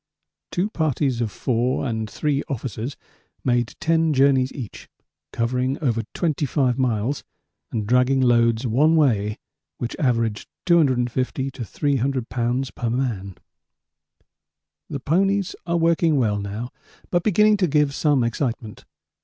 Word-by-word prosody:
Two 180 +3 0
parties 140 - 0
of 110 -3 -1
four 125 +4 0
and 110 -3 -2
three 145 +1 -1
officers 125 0 -4 0.5
made 120 -2 0
ten 165 -1 +2
journeys 135 -1 +3
each, 120 -7 -8 0.4
covering 125 +3 -1
over 120 -7 0
25 140 -5 0
miles 125 +2 0 0.5
and 110 -2 -2
dragging 125 +4 +3
loads 120 -1 +3
one 145 +8 +3
way 110 -9 +2 0.4
which 120 - -4
averaged 115 -6 0 0.2
250 130 -5 +1
to 130 -2 -6
300 135 0 -1
lbs. 125 +2 -1
per 120 - -2
man. 115 -7 -2 1.5
The - - -4
ponies 195 +4 +1
are 170 0 +1
working 165 -1 +3
well 105 -5 +1
now, 105 +5 -5 0.4
but 175 - +2
beginning 210 +2 +4
to 185 -3 +2
give 150 -2 +2
some 145 -3 +2
excitement. 115 -2 -3
130 Hz, 125 wpm, -23 LUFS, 115-150 Hz, 1.5 s, beginning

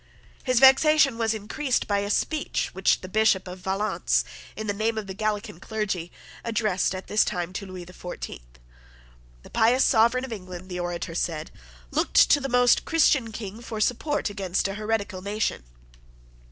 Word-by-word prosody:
His 255 -2 +2
vexation 270 -1 +6
was 225 -1 +1
increased 245 +5 -1
by 205 -1 +1
a 200 0 -3
speech 305 +8 -1
which 190 +1 +2
the 185 - -7
Bishop 195 -2 +2
of 180 +1 -8
Valence, 195 +3 0 0.3
in 215 - -5
the 205 - -1
name 220 +2 -1
of 215 - -3
the 190 - -6
Gallican 210 -1 -3
clergy, 195 -5 -3 0.3
addressed 215 -5 0
at 185 - -7
this 210 - +3
time 180 -2 -3
to 200 +1 -5
Lewis, 185 -1 -8
the 180 - -14
Fourteenth. - - -9 0.9
The - - -15
pious 235 +3 +4
Sovereign 235 +2 +3
of 250 - -6
England, 185 -2 -9
the 180 -1 -4
orator 175 -1 -4
said, 160 -2 -3 0.4
looked - - -1 0.2
to 290 - +6
the 270 - -3
most 245 -1 +4
Christian 270 -7 +2
King 215 0 -7
for 225 -2 -6
support 250 +2 0
against 195 -1 -1
a 195 - -4
heretical 210 -3 -2
nation. 200 - -2
210 Hz, 170 wpm, -25 LUFS, 185-230 Hz, 0.9 s, vexation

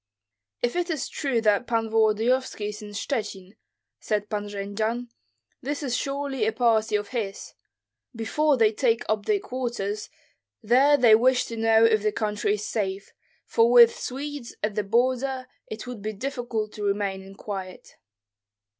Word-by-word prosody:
"If 240 - 0
it 355 0 -1
is 310 -4 -2
true 270 -6 -1
that 215 +1 +2
Pan 230 -1 0
Volodyovski 220 +1 +1
is 210 +1 -8
in 210 - -8
Shchuchyn," 205 -3 -4 0.4
said 210 0 -2
Pan 205 -1 -3
Jendzian, 215 +4 -3 0.5
"this 290 +2 -3
is 250 -4 -1
surely 275 -4 -2
a - - +2
party 220 -2 +2
of 205 -1 -2
his. 210 -6 -4 0.6
Before 285 +6 +1
they 220 -2 +4
take 230 0 +1
up 215 -1 -1
their 420 - +3
quarters 235 - -4 0.5
there 265 +6 +5
they 240 -4 +6
wish 250 +3 +4
to 230 - -6
know 225 0 +4
if 220 -2 +3
the 215 0 +1
country 210 -1 -1
is 210 0 -6
safe, 195 -3 -3 0.3
for 230 +1 +3
with 235 -1 +8
Swedes 280 -1 -6
at 210 0 0
the 210 - 0
border 255 +4 0 0.2
it 215 +2 -7
would 245 -4 -7
be 215 +1 -3
difficult 235 -2 -3
to 210 - -6
remain 200 -1 -1
in 195 +1 -13
quiet." 190 -2 -7
225 Hz, 160 wpm, -25 LUFS, 210-250 Hz, 0.6 s, with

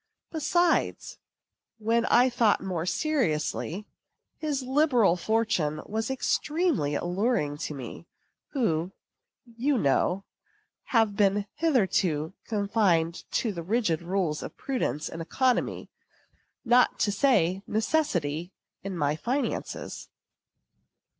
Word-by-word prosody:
Besides, 345 +2 +1 0.6
when 230 +1 +1
I 250 +2 +5
thought 240 -4 +3
more 180 -3 -3
seriously, 195 - -1 0.5
his 290 -4 -2
liberal 255 - +3
fortune 180 -7 0
was 220 +2 -3
extremely 280 - 0
alluring 175 - 0
to 155 - -4
me, 135 +5 -8 0.5
who, 180 - 0 0.5
you 245 +4 0
know, 180 - +1 0.6
have 225 -6 +2
been 200 0 +2
hitherto 190 - +1
confined 200 -6 +1
to 225 - +1
the 170 -4 -5
rigid 180 -3 0
rules 170 -3 -1
of - - -8
prudence 255 - -2
and 165 - -6
economy, 255 +9 0 0.7
not 245 +1 +4
to 205 - +2
say 195 -6 +2
necessity, 175 - 0 0.3
in 195 -2 -5
my 145 -1 +1
finances. 255 - -3
205 Hz, 100 wpm, -27 LUFS, 170-250 Hz, 0.7 s, I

